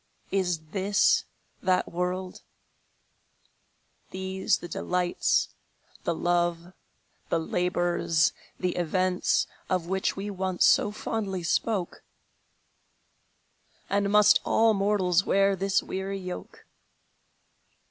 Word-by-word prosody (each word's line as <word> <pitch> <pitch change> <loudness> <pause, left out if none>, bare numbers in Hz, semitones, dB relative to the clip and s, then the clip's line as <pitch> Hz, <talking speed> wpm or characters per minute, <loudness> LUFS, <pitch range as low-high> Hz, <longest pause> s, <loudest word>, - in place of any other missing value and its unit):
Is 180 -4 0
this 200 +1 +2 0.4
that 185 -1 +1
world? 180 +1 -3 1.7
These 190 +1 -1
the 175 - -8
delights, 180 +1 0 0.6
The 170 - 0
love, 175 +1 0 0.6
the - - +2
labors, 175 -1 +1 0.3
the 180 -1 -1
events, 180 +1 +1 0.2
Of 185 -3 0
which 190 +2 -1
we 200 +1 -4
once 185 -2 0
so - - +4
fondly 200 -4 -3
spoke? 190 +1 -1 1.9
And 200 0 +1
must 210 0 +6
all 225 0 +3
mortals 195 -3 +2
wear 195 0 +3
this 195 +1 +1
weary 195 +1 -4
yoke? 185 -1 -8
185 Hz, 95 wpm, -27 LUFS, 175-195 Hz, 1.9 s, must